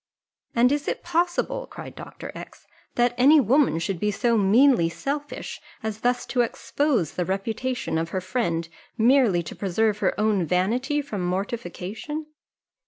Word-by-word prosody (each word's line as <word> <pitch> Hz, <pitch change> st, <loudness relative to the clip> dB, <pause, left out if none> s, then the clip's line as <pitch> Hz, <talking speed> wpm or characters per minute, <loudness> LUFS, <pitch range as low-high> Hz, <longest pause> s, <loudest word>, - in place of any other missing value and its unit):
"And 245 Hz, +2 st, +5 dB
is 290 Hz, 0 st, -1 dB
it -, -, -2 dB
possible," 350 Hz, +9 st, 0 dB
cried -, -, -9 dB
Dr. -, -, -9 dB
X, -, -, -11 dB, 0.3 s
"that 240 Hz, 0 st, +3 dB
any 290 Hz, +5 st, +7 dB
woman 265 Hz, -, +3 dB
should 175 Hz, +2 st, -2 dB
be 210 Hz, -, +1 dB
so 235 Hz, +3 st, +1 dB
meanly 215 Hz, -2 st, +5 dB
selfish, 285 Hz, -, -5 dB, 0.2 s
as 220 Hz, -1 st, -3 dB
thus 245 Hz, +1 st, 0 dB
to 250 Hz, -, +1 dB
expose 240 Hz, -, 0 dB
the 180 Hz, -, -1 dB
reputation 215 Hz, +1 st, -2 dB
of 165 Hz, 0 st, -2 dB
her 185 Hz, -, -2 dB
friend 180 Hz, -4 st, -1 dB, 0.3 s
merely 230 Hz, -7 st, +4 dB
to -, -, -8 dB
preserve 210 Hz, +2 st, 0 dB
her -, -, 0 dB
own 210 Hz, -3 st, +2 dB
vanity 240 Hz, -, 0 dB
from 215 Hz, -9 st, -4 dB
mortification?" 205 Hz, -, -4 dB
225 Hz, 150 wpm, -25 LUFS, 190-270 Hz, 0.3 s, any